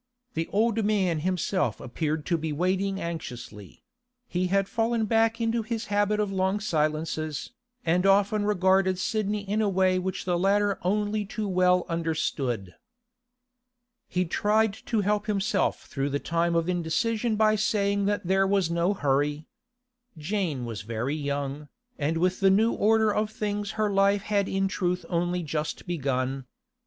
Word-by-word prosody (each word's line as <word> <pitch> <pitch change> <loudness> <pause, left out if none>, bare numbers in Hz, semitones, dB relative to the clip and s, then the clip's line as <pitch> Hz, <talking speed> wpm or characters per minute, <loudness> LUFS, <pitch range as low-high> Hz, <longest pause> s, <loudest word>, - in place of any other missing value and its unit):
The 165 0 -2
old 225 +1 +1
man 190 -6 +1
himself 180 - -1
appeared 150 +4 -3
to 175 - +1
be 160 -1 -2
waiting 190 +5 0
anxiously; 120 - -7 0.4
he 180 +1 -1
had 195 +1 +1
fallen 230 0 0
back 225 +1 +2
into 230 0 +1
his 225 0 -4
habit 205 +1 +2
of 205 -2 0
long 190 +1 0
silences, 155 -4 -2 0.3
and 175 +2 +2
often 205 +2 +3
regarded 190 -2 +2
Sidney 210 0 -1
in 210 +2 0
a 210 - +2
way 185 -1 +2
which 185 +1 -3
the 175 -1 +1
latter 200 +1 +2
only 210 +3 0
too 210 +1 -4
well 180 -1 +3
understood. 145 - -2 1.3
He 180 0 0
tried 210 +5 +2
to 220 -3 +1
help 205 +1 0
himself 205 -1 0
through 135 0 -2
the 140 - 0
time 170 +2 0
of 165 0 +1
indecision 215 +7 0
by 215 0 +4
saying 200 -1 +1
that 205 -2 -1
there 195 +2 +3
was 195 -4 +1
no 170 +4 +1
hurry. 145 0 0 0.7
Jane 155 - -2
was 115 -3 -5
very 115 +5 -3
young, 145 0 -3 0.3
and 155 +3 0
with 180 +2 +1
the 195 - +5
new 220 +4 +3
order 220 0 +3
of 210 +1 0
things 210 -1 -3
her 215 -1 +1
life 200 0 +3
had 200 -1 0
in 195 0 +1
truth 180 -2 -1
only 175 0 0
just 150 0 -3
begun. 135 -5 -2
190 Hz, 155 wpm, -27 LUFS, 160-205 Hz, 1.3 s, the